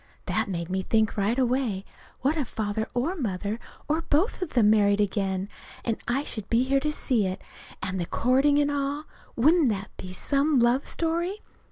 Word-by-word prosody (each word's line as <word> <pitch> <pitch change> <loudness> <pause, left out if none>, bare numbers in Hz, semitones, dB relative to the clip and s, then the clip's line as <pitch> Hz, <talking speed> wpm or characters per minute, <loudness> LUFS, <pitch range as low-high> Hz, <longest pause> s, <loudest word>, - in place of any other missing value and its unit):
That - - 0
made 170 -3 -3
me 190 +1 -1
think 220 +2 +1
right 210 +4 +1
away: 245 -6 0 0.4
what 280 +4 +2
if 290 -6 -1
Father 220 0 -2
or 285 +10 0
Mother, 210 - -2 0.3
or 310 +2 +1
both 330 +7 +1
of 365 - -3
them, 215 -4 +5
married 205 -1 +4
again? 195 -2 0 0.4
And 230 - +1
I 260 +4 +1
should 215 -8 -6
be 240 +3 +2
there 275 +1 +3
to 300 +2 -1
see 240 -8 +1
it, 185 +1 -4 0.4
and 185 -1 -2
the 170 - -3
courting, 270 +4 +3
and 290 0 +2
all! 285 +1 -1 0.3
Wouldn't 305 +3 +4
that 195 -2 -4
be 185 - -7
some 280 +9 +1
love 240 +3 +3
story? 340 +5 -1
240 Hz, 185 wpm, -26 LUFS, 205-285 Hz, 0.4 s, them